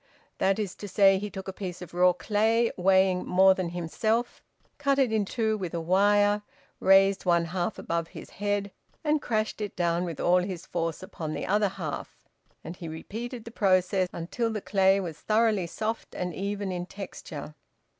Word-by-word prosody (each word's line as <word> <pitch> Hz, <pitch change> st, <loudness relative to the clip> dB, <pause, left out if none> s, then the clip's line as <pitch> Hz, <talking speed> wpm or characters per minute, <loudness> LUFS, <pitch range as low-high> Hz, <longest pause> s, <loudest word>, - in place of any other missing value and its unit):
That 195 Hz, 0 st, +2 dB
is 205 Hz, -4 st, -2 dB
to 205 Hz, -, -7 dB
say, 195 Hz, -1 st, +5 dB
he 210 Hz, +1 st, -4 dB
took 190 Hz, -1 st, -8 dB
a 190 Hz, -, -4 dB
piece 185 Hz, -3 st, -6 dB
of 180 Hz, -2 st, -10 dB
raw 180 Hz, +1 st, +5 dB
clay 220 Hz, +5 st, +1 dB
weighing 190 Hz, 0 st, +3 dB
more 190 Hz, +1 st, +5 dB
than 185 Hz, -2 st, -3 dB
himself, 215 Hz, +8 st, -1 dB, 0.4 s
cut 280 Hz, -1 st, +2 dB
it 265 Hz, -4 st, +3 dB
in 215 Hz, -2 st, +2 dB
two 220 Hz, 0 st, -1 dB
with 180 Hz, -3 st, -4 dB
a -, -, -1 dB
wire, 205 Hz, +4 st, +3 dB, 0.4 s
raised 195 Hz, 0 st, +5 dB
one 170 Hz, -2 st, +3 dB
half 175 Hz, +1 st, -2 dB
above 170 Hz, 0 st, -2 dB
his -, -, -11 dB
head 205 Hz, 0 st, -2 dB, 0.3 s
and 300 Hz, -1 st, +1 dB
crashed 215 Hz, -3 st, -1 dB
it 205 Hz, -2 st, -4 dB
down 170 Hz, 0 st, +1 dB
with 170 Hz, -5 st, -5 dB
all 180 Hz, +1 st, +4 dB
his 180 Hz, -2 st, -4 dB
force 165 Hz, 0 st, -3 dB
upon 160 Hz, -4 st, -5 dB
the -, -, -3 dB
other 205 Hz, 0 st, +2 dB
half, 170 Hz, -6 st, -6 dB, 0.5 s
and 165 Hz, +3 st, -8 dB
he 170 Hz, -, -7 dB
repeated 225 Hz, +9 st, -6 dB
the 230 Hz, -, -8 dB
process 185 Hz, -3 st, +2 dB
until 205 Hz, +8 st, -2 dB
the 215 Hz, -, -2 dB
clay 195 Hz, -1 st, +3 dB
was 170 Hz, -5 st, -5 dB
thoroughly 215 Hz, -4 st, +2 dB
soft 220 Hz, +6 st, -4 dB
and 180 Hz, -1 st, -3 dB
even 200 Hz, +1 st, -3 dB
in 180 Hz, 0 st, -4 dB
texture. 175 Hz, -6 st, -8 dB
190 Hz, 185 wpm, -27 LUFS, 175-210 Hz, 0.5 s, say